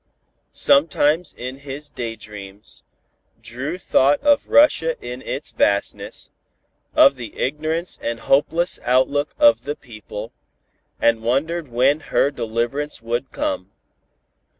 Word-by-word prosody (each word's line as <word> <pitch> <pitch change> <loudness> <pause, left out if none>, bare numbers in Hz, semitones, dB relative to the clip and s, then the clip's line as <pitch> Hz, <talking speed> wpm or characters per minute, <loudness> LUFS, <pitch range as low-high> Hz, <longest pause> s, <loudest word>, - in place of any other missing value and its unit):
Sometimes 150 +3 +3
in 125 +2 -6
his 140 +1 -7
day 115 -2 -5
dreams, 105 -1 -10 0.6
Dru 125 +9 -5
thought 145 -5 +3
of 290 -1 +3
Russia 165 - +4
in 125 +1 -7
its - - -5
vastness, 100 0 -1 0.6
of 140 -1 +6
the 120 -4 -8
ignorance 155 +5 -2
and 115 0 -3
hopeless 165 +6 +1
outlook 135 +4 +1
of 295 -1 +5
the 145 +1 -3
people, 110 -1 -9 0.7
and 115 -1 +3
wondered 150 +8 -1
when 130 +5 +2
her 145 - +1
deliverance 120 +4 -3
would 120 +3 -3
come. 295 -1 -3
135 Hz, 115 wpm, -21 LUFS, 115-155 Hz, 0.7 s, of